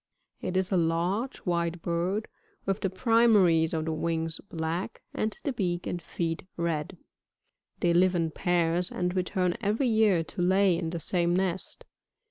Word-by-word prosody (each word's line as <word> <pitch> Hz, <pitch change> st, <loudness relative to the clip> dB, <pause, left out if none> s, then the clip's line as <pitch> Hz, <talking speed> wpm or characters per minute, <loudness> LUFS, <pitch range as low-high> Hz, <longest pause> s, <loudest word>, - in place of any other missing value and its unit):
It 185 Hz, -, -2 dB
is 190 Hz, +1 st, 0 dB
a 190 Hz, -, +3 dB
large, 175 Hz, +9 st, 0 dB
white 170 Hz, -1 st, 0 dB
bird, 180 Hz, +5 st, -1 dB, 0.4 s
with 195 Hz, +1 st, -1 dB
the 195 Hz, -, 0 dB
primaries 195 Hz, -6 st, +4 dB
of 160 Hz, -1 st, -1 dB
the 160 Hz, -, -1 dB
wings 165 Hz, 0 st, -2 dB
black, 165 Hz, +3 st, -3 dB
and 215 Hz, 0 st, -2 dB
the 280 Hz, -, -1 dB
beak 180 Hz, -6 st, -2 dB
and 175 Hz, -, -3 dB
feet 165 Hz, 0 st, -3 dB, 0.2 s
red. 170 Hz, +1 st, -2 dB, 0.8 s
They 170 Hz, -1 st, +3 dB
live 180 Hz, +1 st, +4 dB
in 165 Hz, -2 st, 0 dB
pairs, 175 Hz, 0 st, +1 dB
and 180 Hz, +1 st, -2 dB
return 180 Hz, -1 st, 0 dB
every 225 Hz, +5 st, +1 dB
year 215 Hz, -6 st, +3 dB
to 175 Hz, +3 st, -6 dB
lay 190 Hz, +1 st, +4 dB
in 165 Hz, -1 st, -2 dB
the 170 Hz, 0 st, -4 dB
same 175 Hz, +1 st, 0 dB
nest. 190 Hz, -1 st, -2 dB
175 Hz, 160 wpm, -28 LUFS, 170-190 Hz, 0.8 s, primaries